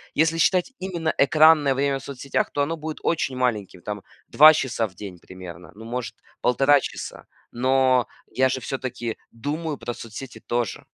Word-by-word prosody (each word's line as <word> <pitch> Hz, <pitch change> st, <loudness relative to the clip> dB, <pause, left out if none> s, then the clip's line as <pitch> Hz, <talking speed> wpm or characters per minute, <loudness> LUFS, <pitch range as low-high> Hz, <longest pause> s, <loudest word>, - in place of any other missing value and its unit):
Если 165 Hz, +2 st, +2 dB
считать 180 Hz, +7 st, +2 dB
именно 170 Hz, -4 st, -2 dB
экранное 150 Hz, 0 st, +5 dB
время 140 Hz, 0 st, 0 dB
в -, -, -14 dB
соцсетях, 140 Hz, 0 st, -2 dB
то 145 Hz, -, -1 dB
оно 160 Hz, +3 st, -1 dB
будет 155 Hz, 0 st, -6 dB
очень 140 Hz, -5 st, 0 dB
маленьким, 110 Hz, -8 st, -2 dB
там, 105 Hz, -1 st, -5 dB, 0.3 s
2 155 Hz, +2 st, +8 dB
часа 120 Hz, -5 st, -1 dB
в 95 Hz, -, -19 dB
день 95 Hz, -2 st, -9 dB
примерно, 90 Hz, -1 st, -11 dB
ну, 110 Hz, -, -11 dB
может, 120 Hz, +1 st, -5 dB, 0.2 s
1,5 135 Hz, +3 st, +4 dB
часа. -, -, -7 dB, 0.3 s
Но 130 Hz, 0 st, +2 dB, 0.2 s
я 130 Hz, +1 st, +3 dB
же 130 Hz, 0 st, -2 dB
всё-таки 125 Hz, -4 st, -4 dB
думаю 145 Hz, +5 st, -4 dB
про 120 Hz, -, -5 dB
соцсети 115 Hz, +3 st, -9 dB
тоже. 120 Hz, -3 st, -3 dB
130 Hz, 165 wpm, -24 LUFS, 115-150 Hz, 0.3 s, 2